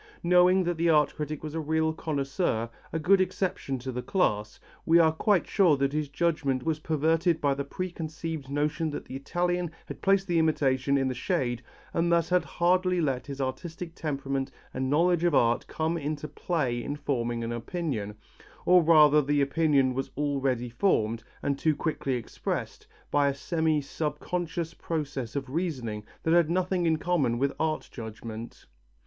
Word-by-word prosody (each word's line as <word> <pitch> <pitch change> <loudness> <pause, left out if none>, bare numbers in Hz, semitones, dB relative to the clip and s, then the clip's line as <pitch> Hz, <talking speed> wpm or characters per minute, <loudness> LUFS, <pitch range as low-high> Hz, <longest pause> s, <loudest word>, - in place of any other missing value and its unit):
Knowing 180 +2 +5
that 175 -1 -1
the 170 +1 +2
art 150 -2 +4
critic 150 -1 -4
was 155 -1 -5
a 165 - -2
real 160 +1 +1
connoisseur, 140 -6 -1 0.2
a - - -1
good 190 +4 +4
exception 180 -7 -1
to 130 +1 -5
the 125 0 -3
class, 105 - 0 0.2
we 165 +1 +5
are 160 -2 +6
quite 185 +4 +2
sure 175 -8 +3
that 140 +1 0
his 150 -2 -1
judgment 145 -4 0
was 155 +1 -1
perverted 160 +2 +1
by 140 -2 +2
the 140 +1 -3
preconceived 160 -2 -5
notion 150 +3 0
that 145 - -6
the - - -8
Italian 175 +5 -1 0.2
had - - -9
placed 195 -1 +3
the 175 -3 +1
imitation 140 -3 +2
in 135 -1 +1
the 130 - -1
shade 125 -5 -1 0.3
and 170 +1 +1
thus 170 -1 +2
had 180 0 +3
hardly 180 +1 +1
let 135 -5 -1
his 140 -1 -6
artistic 165 +6 -4
temperament 135 -4 -3 0.2
and 130 0 -2
knowledge 170 +3 +3
of 170 -4 +3
art 120 0 +2
come 160 +1 -1
into 150 0 -3
play 140 -5 -2
in 145 - -3
forming 120 -5 -2
an 115 - -3
opinion, 120 - -3 0.5
or 180 0 +6
rather 150 -2 +6
the 145 +1 +1
opinion 140 -2 +2
was 135 +1 -3
already 135 -4 0
formed, 115 - +1 0.2
and 140 -1 0
too 155 -2 +2
quickly 140 -5 -1
expressed, 120 - -4 0.2
by 145 -1 +3
a 140 - 0
semi 160 +1 0
subconscious 165 +3 -3
process 145 -7 -4
of 140 -1 -2
reasoning 130 -11 -2 0.2
that 160 - +2
had 170 -2 +4
nothing 180 0 +1
in 160 -1 +3
common 155 -8 +1
with 140 +3 0
art 155 -1 -1
judgment. 110 0 -8
150 Hz, 170 wpm, -28 LUFS, 135-170 Hz, 0.5 s, are